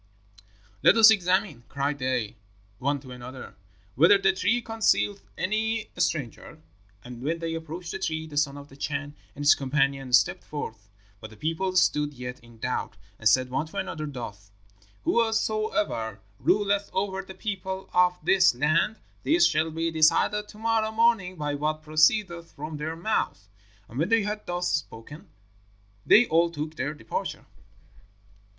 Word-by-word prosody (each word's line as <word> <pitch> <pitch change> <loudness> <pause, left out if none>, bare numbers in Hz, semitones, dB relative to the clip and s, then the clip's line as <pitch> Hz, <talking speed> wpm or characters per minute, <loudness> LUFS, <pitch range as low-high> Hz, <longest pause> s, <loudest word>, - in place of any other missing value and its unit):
"'Let - - +6
us 220 0 +9
examine,' 185 - +1
cried 140 +1 -2
they 130 -4 -1 0.4
one 140 +2 0
to 130 -2 -12
another, 125 +1 -9 0.4
'whether 165 - +6
the 195 - +2
tree 205 +6 +1
concealeth 225 -3 +1 0.2
any 220 +2 -1
stranger.' 155 - -2 0.4
And 120 -1 -10
when 160 +5 -1
they 165 -1 -4
approached 165 +2 -6
the 190 - -5
tree 160 -3 -2
the 155 -2 -10
son 145 -1 +1
of 145 0 -11
the 135 - -15
Chan 145 +1 -4 0.2
and 145 0 -5
his 145 - +8
companion 135 -1 0
stepped 125 -1 +3
forth. 110 -9 -7 0.3
But 110 - -9
the 110 - -15
people 165 - -2
stood 150 -4 +2
yet 125 0 -7
in 120 -1 -18
doubt, 110 -2 -3 0.2
and 110 - +4
said 130 +3 +2
one 140 +5 -1
to - - -10
another 155 -1 -3
thus, 105 -7 -8 0.5
'Whosoever 215 - 0 0.2
ruleth 205 0 +1
over 190 0 -1
the 190 - -11
people 190 -2 -4
of 180 0 +4
this 190 -9 +4
land, 155 - +2 0.3
this 345 +3 +4
shall 155 +1 +2
be 165 +1 -2
decided 165 +6 +3
to 210 - -14
morrow 220 0 0
morning 220 -5 +2
by 150 -3 -3
what 155 +2 -2
proceedeth 170 +3 +2
from 150 +1 -6
their 160 +2 -4
mouths.' 165 - -2 0.4
And 120 - -7
when 165 +5 +1
they 225 -2 +3
had 210 +1 -4
thus 175 0 -1
spoken, 145 +1 -5 0.8
they 240 - +7
all 170 -1 +3
took 155 -1 -5
their 145 0 -3
departure. 115 -6 -5
160 Hz, 155 wpm, -26 LUFS, 135-195 Hz, 0.8 s, us